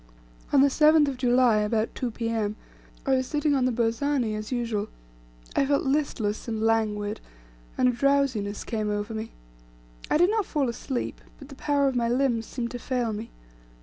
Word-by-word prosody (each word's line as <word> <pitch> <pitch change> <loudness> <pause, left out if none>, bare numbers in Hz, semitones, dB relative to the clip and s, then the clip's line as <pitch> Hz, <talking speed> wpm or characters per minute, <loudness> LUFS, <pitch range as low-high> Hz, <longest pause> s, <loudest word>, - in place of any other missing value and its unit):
On 280 - +5
the 280 - +6
7th 300 +1 +5
of 265 - -5
July, 245 -2 +4
about 215 +1 0
2 250 - -2
P.M., 225 -2 -2 0.5
I 270 - +2
was 260 0 -1
sitting 295 0 +1
on 265 -2 +2
the 255 - +2
burzani 235 +1 0
as 215 +2 -5
usual; 230 -4 -1 0.7
I - - +3
felt 280 +1 +1
listless 265 -7 -1
and 220 -2 -2
languid, 215 -2 0 0.6
and 255 - +4
a - - +4
drowsiness 245 -5 +1
came 215 -2 -2
over 205 +2 -2
me; 220 +1 -5 0.8
I - - +3
did 350 +5 +4
not 435 -3 0
fall 280 -5 0
asleep, 245 +2 -4 0.2
but 275 -1 -13
the 275 - -10
power 285 0 +1
of 265 - 0
my 235 -1 +1
limbs 240 -3 +1
seemed 235 -2 -4
to 245 - -5
fail 245 -3 -1
me. 215 +2 -6
245 Hz, 180 wpm, -26 LUFS, 220-275 Hz, 0.8 s, the